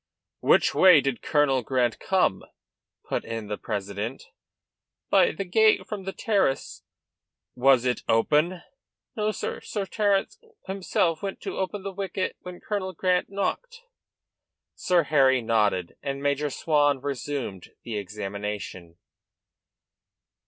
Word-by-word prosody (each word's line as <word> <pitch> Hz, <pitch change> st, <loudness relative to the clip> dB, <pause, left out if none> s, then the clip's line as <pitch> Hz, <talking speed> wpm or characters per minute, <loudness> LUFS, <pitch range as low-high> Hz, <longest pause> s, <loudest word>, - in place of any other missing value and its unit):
"Which -, -, +4 dB
way 185 Hz, -5 st, +7 dB
did 135 Hz, -3 st, -2 dB
Colonel 145 Hz, -3 st, +2 dB
Grant 120 Hz, -1 st, 0 dB
come?" 185 Hz, -, +1 dB, 0.6 s
put -, -, -2 dB
in 115 Hz, -2 st, -6 dB
the 105 Hz, -, -3 dB
president. 105 Hz, +3 st, -4 dB, 0.9 s
"By -, -, +5 dB
the 195 Hz, +6 st, -5 dB
gate 220 Hz, +4 st, +3 dB
from 205 Hz, -3 st, -6 dB
the 195 Hz, -, -3 dB
terrace." 195 Hz, -11 st, 0 dB, 0.7 s
"Was 130 Hz, 0 st, +4 dB
it 125 Hz, -1 st, 0 dB
open?" 155 Hz, +10 st, +2 dB, 0.5 s
"No, 215 Hz, -2 st, 0 dB
sir. 215 Hz, -, -4 dB
Sir 205 Hz, -2 st, -4 dB
Terence 200 Hz, -1 st, 0 dB, 0.3 s
himself 185 Hz, -4 st, 0 dB
went 195 Hz, -1 st, -4 dB
to -, -, -5 dB
open 190 Hz, +1 st, -3 dB
the 195 Hz, 0 st, -5 dB
wicket 190 Hz, 0 st, -3 dB
when 180 Hz, -1 st, -9 dB
Colonel 190 Hz, -3 st, -3 dB
Grant 180 Hz, +1 st, +1 dB
knocked." 460 Hz, -, -3 dB, 0.9 s
Sir 180 Hz, -2 st, +2 dB
Harry 135 Hz, -3 st, +4 dB
nodded 105 Hz, -6 st, 0 dB
and 135 Hz, 0 st, -3 dB
Major 145 Hz, +1 st, 0 dB
Swan 145 Hz, -1 st, +2 dB
resumed 135 Hz, -8 st, -4 dB
the 115 Hz, -, -5 dB
examination. 100 Hz, -3 st, -6 dB
145 Hz, 125 wpm, -26 LUFS, 115-190 Hz, 0.9 s, way